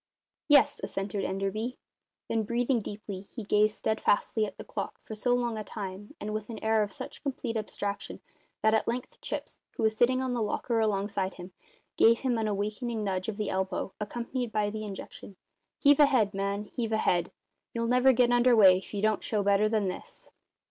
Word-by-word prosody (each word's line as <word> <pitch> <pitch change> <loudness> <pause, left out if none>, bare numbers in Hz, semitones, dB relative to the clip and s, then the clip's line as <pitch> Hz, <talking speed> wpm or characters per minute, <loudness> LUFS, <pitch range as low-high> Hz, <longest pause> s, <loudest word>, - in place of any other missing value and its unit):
"Yes," 290 -3 +5
assented 195 +1 -3
Enderby. 195 +6 -2 0.5
Then, 225 - +1
breathing 235 +3 +1
deeply, 205 -2 -7
he 230 - -6
gazed 210 +1 +3
steadfastly 220 0 +1
at - - -11
the - - -7
clock - - -5
for - - -8
so 245 +3 +1
long 240 -3 -1
a - - -4
time 200 -1 -7
and 215 +1 -4
with 215 0 -4
an 225 - -5
air 220 0 +3
of 205 -1 -1
such - - -8
complete 255 -4 -3
abstraction 205 -2 -4 0.4
that 220 0 +4
at 220 - +2
length 245 +2 -4
Chips, - - -5 0.2
who - - -1
was 220 0 +3
sitting 255 +3 +3
on 260 -1 -1
the 240 - -1
locker 225 +2 0
alongside 200 -2 0
him, 180 +1 -9 0.5
gave 230 +1 +5
him 250 -4 +1
an 220 - 0
awakening 215 +3 -2
nudge 190 0 -1
of 210 - -5
the 210 -2 -2
elbow, 190 0 -2
accompanied 240 +3 -3
by 210 -1 0
the 215 0 -5
injunction: 200 -1 -8 0.4
"Heave 285 0 +5
ahead, 255 -8 +4
man; 200 +1 -2
heave 230 -2 -2
ahead! 175 -5 +1 0.4
You'll 230 0 -2
never 250 +2 +5
get 245 -1 +3
under 245 0 +5
way 190 -4 +7
if 195 - -10
you 200 - -2
don't 215 -1 +2
show 210 -2 0
better 200 +1 +3
than 215 -3 +1
this." 475 - -7
215 Hz, 190 wpm, -29 LUFS, 200-235 Hz, 0.5 s, way